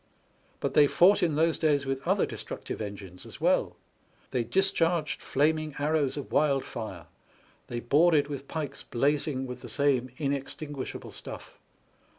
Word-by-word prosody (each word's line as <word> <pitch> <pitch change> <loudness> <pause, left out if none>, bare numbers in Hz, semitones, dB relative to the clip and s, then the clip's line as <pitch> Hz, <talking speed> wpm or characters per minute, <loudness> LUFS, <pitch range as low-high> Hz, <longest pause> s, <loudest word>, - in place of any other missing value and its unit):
But - - -2
they 145 -1 +7
fought 195 +7 +5
in 165 -4 +2
those 160 +1 +2
days 145 -3 +2
with 135 0 -2
other - - +3
destructive - - -6
engines 100 -3 -7
as - - -11
well; - - +2 0.6
they 125 - +1
discharged 170 0 +1
flaming 155 +1 +1
arrows 150 -1 +1
of 145 - -6
wildfire; 120 - 0 0.6
they 120 0 -4
boarded 145 +4 +4
with 140 -2 -6
pikes 145 -4 -4
blazing 140 +1 0
with 125 -1 -7
the - - -9
same 140 -3 +1
inextinguishable 140 0 -4
stuflF. - - -9
145 Hz, 140 wpm, -28 LUFS, 130-155 Hz, 0.6 s, they